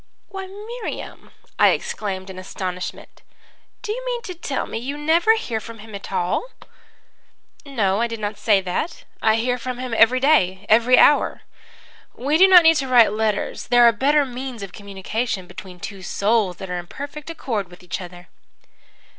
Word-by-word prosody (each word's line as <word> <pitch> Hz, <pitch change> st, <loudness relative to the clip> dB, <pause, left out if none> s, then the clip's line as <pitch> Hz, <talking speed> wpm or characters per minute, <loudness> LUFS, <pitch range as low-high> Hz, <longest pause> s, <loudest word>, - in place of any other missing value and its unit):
"'Why, 385 Hz, -1 st, -6 dB
Miriam!' 430 Hz, +5 st, -7 dB, 0.3 s
I -, -, +7 dB
exclaimed 190 Hz, -2 st, -3 dB
in 185 Hz, -, -9 dB
astonishment. 185 Hz, -1 st, -6 dB, 0.6 s
'Do 430 Hz, -, -3 dB
you -, -, -4 dB
mean -, -, -3 dB
to 370 Hz, -, -6 dB
tell 295 Hz, -5 st, -3 dB
me -, -, -5 dB
you 275 Hz, +5 st, -5 dB
never 335 Hz, +9 st, +3 dB
hear 240 Hz, -, -3 dB
from 230 Hz, +1 st, -10 dB
him 220 Hz, 0 st, -12 dB
at 200 Hz, 0 st, -8 dB
all?' 180 Hz, -, -1 dB, 1.2 s
"'No, 215 Hz, -6 st, 0 dB
I 235 Hz, -, +2 dB
did 230 Hz, -1 st, -6 dB
not 210 Hz, 0 st, -4 dB
say 205 Hz, -3 st, +3 dB
that. 185 Hz, -, -3 dB, 0.2 s
I 220 Hz, 0 st, +4 dB
hear 245 Hz, +2 st, 0 dB
from 250 Hz, +1 st, -5 dB
him 250 Hz, -1 st, -5 dB
every 235 Hz, +3 st, +5 dB
day 200 Hz, -10 st, +2 dB
every 235 Hz, +3 st, +5 dB
hour. 295 Hz, -, +4 dB, 0.7 s
We 290 Hz, +6 st, 0 dB
do 380 Hz, -, +8 dB
not 365 Hz, -2 st, +8 dB
need 325 Hz, -1 st, +6 dB
to 270 Hz, -, -1 dB
write 240 Hz, -5 st, +5 dB
letters. 215 Hz, -1 st, -2 dB
There 245 Hz, 0 st, +5 dB
are -, -, +7 dB
better 285 Hz, +6 st, +2 dB
means 250 Hz, -3 st, -6 dB
of 195 Hz, -1 st, -8 dB
communication 200 Hz, +1 st, -4 dB
between 185 Hz, 0 st, -11 dB
two 195 Hz, +2 st, -7 dB
souls 200 Hz, -1 st, 0 dB
that 190 Hz, -2 st, -7 dB
are 180 Hz, -, -2 dB
in 175 Hz, -, -9 dB
perfect 290 Hz, -, -8 dB
accord 225 Hz, -, -3 dB
with 180 Hz, 0 st, -15 dB
each 180 Hz, +1 st, -5 dB
other.' 175 Hz, 0 st, -11 dB
230 Hz, 180 wpm, -22 LUFS, 195-290 Hz, 1.2 s, do